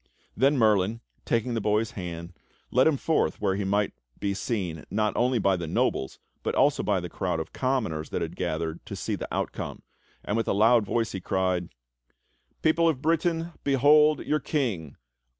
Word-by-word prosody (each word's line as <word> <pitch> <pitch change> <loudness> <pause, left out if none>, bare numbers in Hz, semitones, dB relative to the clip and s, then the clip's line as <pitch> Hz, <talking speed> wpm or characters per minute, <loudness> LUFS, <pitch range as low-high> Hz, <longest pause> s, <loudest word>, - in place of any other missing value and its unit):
Then 140 +2 +3
Merlin, 110 -1 +3 0.3
taking 115 +1 0
the 115 - -1
boy's 105 +2 +1
hand, 85 -2 -6 0.4
led 130 +4 +5
him 155 -3 +3
forth 160 +4 0
where 100 -2 +1
he 100 - -2
might 100 +1 +1 0.3
be 100 -1 -1
seen 95 -7 -3
not 105 0 0
only 125 +1 +2
by 100 -3 +3
the 85 -2 -4
nobles, 65 -3 0 0.2
but - - -2
also - - +3
by - - +1
the - - -5
crowd 80 - -2
of 80 - -6
commoners 110 - -1
that - - -2
had - - -5
gathered 80 +1 -3
to - - -5
see - - -3
the - - -5
outcome; - - -4 0.4
and 105 - -1
with 115 - -1
a - - +2
loud 110 +1 +4
voice 115 -2 0
he 95 - -5
cried: 90 -1 0 0.9
"People 165 +1 +4
of 150 -5 -1
Britain, 165 +1 +1
behold 150 +2 +5
your 150 - +1
King! 105 - -2
110 Hz, 180 wpm, -27 LUFS, 95-135 Hz, 0.9 s, led